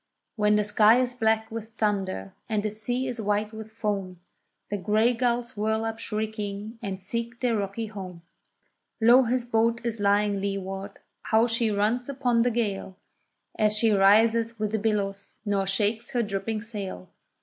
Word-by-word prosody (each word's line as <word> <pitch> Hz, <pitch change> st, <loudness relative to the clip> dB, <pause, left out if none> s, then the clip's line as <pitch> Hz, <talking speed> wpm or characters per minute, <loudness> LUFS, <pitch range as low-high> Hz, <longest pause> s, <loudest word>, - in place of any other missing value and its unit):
When 210 Hz, -1 st, +3 dB
the 210 Hz, -, +3 dB
sky 210 Hz, +3 st, +5 dB
is 250 Hz, -1 st, 0 dB
black 220 Hz, -1 st, +1 dB
with 225 Hz, 0 st, -7 dB
thunder, 195 Hz, -, -1 dB, 0.2 s
and 215 Hz, -2 st, 0 dB
the 215 Hz, -, -1 dB
sea 245 Hz, +5 st, -2 dB
is 245 Hz, -3 st, -3 dB
white 210 Hz, +1 st, 0 dB
with 220 Hz, 0 st, -8 dB
foam, 200 Hz, -5 st, -3 dB, 0.5 s
The 205 Hz, -, 0 dB
gray 215 Hz, +5 st, +2 dB
gulls 240 Hz, -1 st, -1 dB
whirl 220 Hz, +1 st, 0 dB
up 225 Hz, 0 st, -3 dB
shrieking 215 Hz, 0 st, -4 dB
and 195 Hz, -4 st, -4 dB
seek 235 Hz, +5 st, -4 dB
their 245 Hz, -3 st, +1 dB
rocky 205 Hz, +2 st, -2 dB
home, 185 Hz, -5 st, -8 dB, 0.8 s
Low 240 Hz, +3 st, +6 dB
his 245 Hz, +1 st, 0 dB
boat 230 Hz, 0 st, +2 dB
is 230 Hz, -2 st, -2 dB
lying 205 Hz, 0 st, +2 dB
leeward, 195 Hz, 0 st, -4 dB, 0.3 s
how 220 Hz, +1 st, +4 dB
she 230 Hz, -1 st, +1 dB
runs 215 Hz, +5 st, 0 dB
upon 250 Hz, -4 st, +1 dB
the 245 Hz, -, +3 dB
gale, 205 Hz, -5 st, -2 dB, 0.6 s
As 215 Hz, 0 st, +3 dB
she 225 Hz, 0 st, +3 dB
rises 225 Hz, +3 st, +4 dB
with 215 Hz, -1 st, -2 dB
the 220 Hz, -, 0 dB
billows, 200 Hz, -2 st, -2 dB
nor 200 Hz, -2 st, 0 dB
shakes 215 Hz, +3 st, 0 dB
her 240 Hz, -1 st, +2 dB
dripping 210 Hz, +1 st, -3 dB
sail. 200 Hz, -, -6 dB
215 Hz, 165 wpm, -26 LUFS, 200-230 Hz, 0.8 s, Low